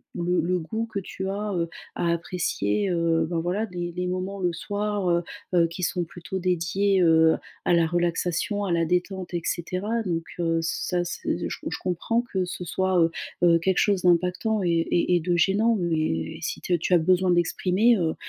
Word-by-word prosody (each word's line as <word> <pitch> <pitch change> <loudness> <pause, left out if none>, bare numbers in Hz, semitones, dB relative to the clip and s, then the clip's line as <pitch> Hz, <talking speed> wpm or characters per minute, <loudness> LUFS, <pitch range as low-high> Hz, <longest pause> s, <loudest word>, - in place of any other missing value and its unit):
le 180 +1 +1
le 180 +2 0
goût 220 +8 -3
que 205 -3 -4
tu 190 0 -5
as, 205 +1 -3
heu, 170 -2 -1 0.3
à 170 -1 0
apprécier, 170 - -1
heu, 165 -2 +1
ben 170 -2 -1
voilà 185 +6 -1
les 175 -1 -4
les 180 0 -2
moments 185 +2 -3
le 175 -1 +1
soir, 205 +2 -2
heu 170 0 +2 0.3
heu, 170 -1 +5
qui 170 +2 -8
sont 175 +1 0
plutôt 175 +3 -6
dédiés, 185 +2 +1
heu, 160 -1 +5 0.3
à - - +1
la 165 -1 +4
relaxation 175 +4 0
à 175 - 0
la 165 0 +2
détente 180 +2 -1
et 170 - -1
cetera. 200 +7 -2
Donc 165 -3 -2 0.2
heu, 165 -1 +1
ça 175 +2 -1
c 175 - -5 0.3
j - - -4
je - - -3
comprends 190 +6 0
que 190 -6 -2
ce 180 0 -5
soit, 185 +3 +1
heu 165 0 +3 0.3
heu, 170 -1 +6
quelque 190 +2 +1
chose 200 -3 +2
d'impactant 180 +5 +2
et 175 - 0
et 170 +2 +2
et - - +3
de 175 +1 +1
gênant 210 +6 +3
mais 155 - -1
si - - -6
t 175 -1 +1
tu 180 - 0
as - - +7
besoin 185 +2 +2
d'exprimer, 185 +6 +3
heu, 165 -3 0
180 Hz, 195 wpm, -25 LUFS, 170-190 Hz, 0.3 s, as